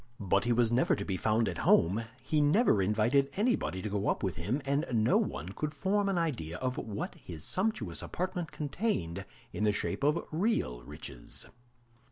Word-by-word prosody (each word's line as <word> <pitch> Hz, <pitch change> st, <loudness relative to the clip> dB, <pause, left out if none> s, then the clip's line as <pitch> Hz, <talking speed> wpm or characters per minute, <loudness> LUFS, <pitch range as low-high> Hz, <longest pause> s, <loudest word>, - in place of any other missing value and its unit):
But 100 Hz, 0 st, +2 dB
he 120 Hz, -, +2 dB
was 115 Hz, -1 st, +3 dB
never 125 Hz, +2 st, +3 dB
to 100 Hz, -, -4 dB
be 95 Hz, -, -1 dB
found 110 Hz, +4 st, +2 dB
at 85 Hz, -, -3 dB
home; 100 Hz, +8 st, +4 dB, 0.2 s
he 155 Hz, -1 st, +2 dB
never 150 Hz, -, +4 dB
invited 110 Hz, +8 st, +3 dB
anybody 205 Hz, -, +1 dB
to 105 Hz, -, -2 dB
go 100 Hz, 0 st, -1 dB
up -, -, 0 dB
with 95 Hz, -5 st, -1 dB
him, 105 Hz, -, -1 dB
and 140 Hz, +2 st, +1 dB
no 110 Hz, -2 st, +4 dB
one 70 Hz, +8 st, -2 dB
could 150 Hz, +10 st, -4 dB
form 200 Hz, +6 st, +1 dB
an 195 Hz, -, +1 dB
idea 115 Hz, -, -1 dB
of 130 Hz, +3 st, -2 dB
what 105 Hz, -2 st, -4 dB
his 80 Hz, -4 st, -9 dB
sumptuous 215 Hz, +4 st, -1 dB
apartment 180 Hz, -3 st, -3 dB
contained 145 Hz, -, -2 dB, 0.3 s
in -, -, -2 dB
the 105 Hz, -, +4 dB
shape 105 Hz, -, -2 dB
of 150 Hz, +3 st, +2 dB
real 155 Hz, -, 0 dB
riches. -, -, -8 dB
115 Hz, 185 wpm, -31 LUFS, 95-155 Hz, 0.3 s, home